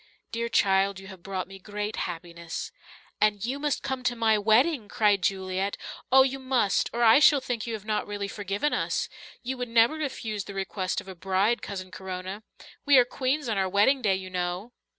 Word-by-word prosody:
Dear 235 Hz, 0 st, -2 dB
child, 195 Hz, -2 st, +2 dB
you 195 Hz, -, -12 dB
have 190 Hz, -3 st, -11 dB
brought 190 Hz, 0 st, -4 dB
me 195 Hz, 0 st, -11 dB
great 210 Hz, +2 st, -4 dB
happiness." 170 Hz, -1 st, -6 dB, 0.5 s
"And 210 Hz, -1 st, +2 dB
you 265 Hz, +4 st, -3 dB
must 295 Hz, -1 st, -1 dB
come 265 Hz, -1 st, -3 dB
to 245 Hz, -1 st, +1 dB
my 225 Hz, -2 st, +3 dB
wedding," 225 Hz, +4 st, +3 dB
cried 205 Hz, -3 st, +2 dB
Juliet. 190 Hz, +1 st, -1 dB, 0.3 s
"Oh, 265 Hz, +1 st, +8 dB
you 270 Hz, 0 st, -2 dB
must 255 Hz, -6 st, +1 dB
or 235 Hz, +1 st, 0 dB
I 225 Hz, +3 st, +7 dB
shall 295 Hz, -1 st, +6 dB
think 240 Hz, -3 st, -4 dB
you 230 Hz, -, -2 dB
have 210 Hz, -1 st, -9 dB
not 215 Hz, -1 st, -1 dB
really 205 Hz, -1 st, -3 dB
forgiven 200 Hz, +7 st, -2 dB
us. -, -, -1 dB, 0.3 s
You 260 Hz, +1 st, -3 dB
would 245 Hz, -1 st, -3 dB
never 230 Hz, +3 st, +4 dB
refuse 235 Hz, -9 st, -4 dB
the 200 Hz, -, -9 dB
request 190 Hz, -1 st, -2 dB
of -, -, -17 dB
a 190 Hz, -, -7 dB
bride, 195 Hz, +5 st, +1 dB
Cousin 185 Hz, -2 st, -6 dB
Corona. 185 Hz, +2 st, -6 dB, 0.4 s
We 285 Hz, -2 st, +6 dB
are 250 Hz, -, +7 dB
queens 265 Hz, +3 st, -1 dB
on 215 Hz, -4 st, 0 dB
our 190 Hz, -1 st, +1 dB
wedding 210 Hz, +8 st, +3 dB
day, 200 Hz, -5 st, +2 dB
you 185 Hz, 0 st, -7 dB
know." 180 Hz, +5 st, -3 dB
210 Hz, 200 wpm, -27 LUFS, 190-245 Hz, 0.5 s, Oh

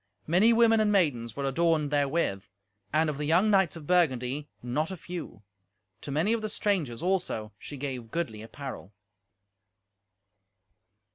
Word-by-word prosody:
Many 185 Hz, +8 st, +4 dB
women 225 Hz, -1 st, +5 dB
and 215 Hz, -1 st, +3 dB
maidens 130 Hz, -, +1 dB
were 140 Hz, -, -3 dB
adorned 155 Hz, +1 st, +1 dB
therewith, 140 Hz, -, 0 dB, 0.4 s
and, 155 Hz, +2 st, +2 dB
of 150 Hz, -2 st, -3 dB
the 150 Hz, -, -1 dB
young 180 Hz, +7 st, +4 dB
knights 190 Hz, -6 st, +3 dB
of 160 Hz, -3 st, -9 dB
Burgundy, 145 Hz, -4 st, +1 dB
not 145 Hz, +6 st, -1 dB
a 190 Hz, -, -5 dB
few. 170 Hz, -, -8 dB, 0.6 s
To -, -, -8 dB
many 160 Hz, +10 st, +1 dB
of 230 Hz, -, 0 dB
the 215 Hz, -, -3 dB
strangers, 170 Hz, -, -1 dB
also, 175 Hz, -, -1 dB
she 145 Hz, -, -8 dB
gave 130 Hz, -4 st, -5 dB
goodly 110 Hz, -8 st, -3 dB
apparel. 115 Hz, -3 st, -8 dB
155 Hz, 145 wpm, -28 LUFS, 130-180 Hz, 0.6 s, women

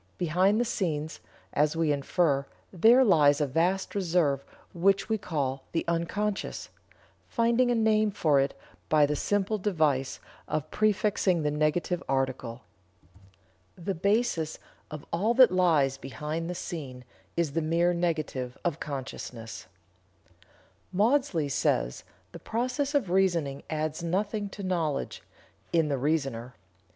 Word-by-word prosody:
Behind 185 Hz, +5 st, +2 dB
the 240 Hz, -, +2 dB
scenes, 160 Hz, -8 st, -2 dB, 0.3 s
as 150 Hz, +2 st, +2 dB
we 165 Hz, -2 st, +1 dB
infer, 140 Hz, 0 st, +1 dB, 0.3 s
there 230 Hz, +8 st, +6 dB
lies 150 Hz, -, +5 dB
a 150 Hz, -, +2 dB
vast 175 Hz, +7 st, 0 dB
reserve 165 Hz, -8 st, +1 dB, 0.3 s
which 195 Hz, +4 st, +2 dB
we 220 Hz, -1 st, +1 dB
call 135 Hz, -7 st, -2 dB
'the 165 Hz, -, 0 dB
unconscious,' 195 Hz, +5 st, -2 dB, 0.6 s
finding 235 Hz, +1 st, +2 dB
a 245 Hz, -, +2 dB
name 215 Hz, -1 st, +3 dB
for 155 Hz, -8 st, +2 dB
it 135 Hz, +1 st, -1 dB, 0.3 s
by 155 Hz, -1 st, +5 dB
the 150 Hz, +1 st, -1 dB
simple 205 Hz, +6 st, 0 dB
device 155 Hz, -9 st, 0 dB, 0.3 s
of 155 Hz, 0 st, -3 dB
prefixing 205 Hz, -5 st, +1 dB
the 150 Hz, -, +1 dB
negative 155 Hz, +4 st, 0 dB
article. 130 Hz, -3 st, -2 dB, 1.1 s
The 195 Hz, +1 st, -3 dB
basis 200 Hz, -3 st, 0 dB, 0.3 s
of 155 Hz, -1 st, -8 dB
all 210 Hz, +8 st, +1 dB
that 255 Hz, -4 st, +7 dB
lies 160 Hz, -7 st, +3 dB
behind 150 Hz, +5 st, -4 dB
the 180 Hz, -, -3 dB
scene 130 Hz, -8 st, -6 dB, 0.3 s
is 170 Hz, -4 st, +1 dB
the 165 Hz, +3 st, -1 dB
mere 170 Hz, +3 st, +2 dB
negative 155 Hz, -7 st, -2 dB
of 170 Hz, -2 st, -1 dB
consciousness." 125 Hz, -5 st, -7 dB, 1.2 s
Maudsley 205 Hz, -, +2 dB
says: 65 Hz, -, 0 dB, 0.3 s
"The -, -, -9 dB
process 255 Hz, +5 st, -2 dB
of 230 Hz, -11 st, +1 dB
reasoning 170 Hz, -7 st, +1 dB
adds 155 Hz, +1 st, -2 dB
nothing 200 Hz, +4 st, -1 dB
to 200 Hz, +1 st, -8 dB
knowledge 170 Hz, -6 st, -2 dB, 0.5 s
(in 165 Hz, -3 st, +2 dB
the 140 Hz, -, 0 dB
reasoner). 135 Hz, -5 st, -1 dB
165 Hz, 130 wpm, -28 LUFS, 145-195 Hz, 1.2 s, that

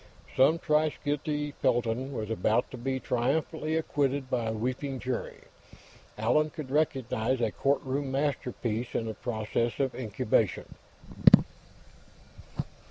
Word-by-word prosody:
Some 135 Hz, +5 st, +5 dB
thrice 155 Hz, -1 st, +2 dB
guilty 150 Hz, 0 st, -1 dB
felon 120 Hz, 0 st, 0 dB
was 110 Hz, -4 st, -4 dB
about 115 Hz, +3 st, +1 dB
to -, -, -7 dB
be 130 Hz, +2 st, -1 dB
triumphantly 155 Hz, +6 st, 0 dB
acquitted 140 Hz, -4 st, 0 dB
by 120 Hz, -3 st, 0 dB
a 110 Hz, -, 0 dB
weeping 130 Hz, +4 st, -2 dB
jury; 125 Hz, -1 st, -4 dB, 0.8 s
Allan 125 Hz, +8 st, +2 dB
could 150 Hz, -3 st, -7 dB
recognize 130 Hz, -4 st, +1 dB
a 115 Hz, -3 st, +1 dB
courtroom 140 Hz, +1 st, 0 dB
masterpiece 125 Hz, -4 st, -2 dB
in 115 Hz, -, 0 dB
the 110 Hz, -, -3 dB
process 115 Hz, +1 st, -2 dB
of 135 Hz, -2 st, +1 dB
incubation. 110 Hz, -6 st, 0 dB
130 Hz, 115 wpm, -29 LUFS, 115-145 Hz, 0.8 s, Some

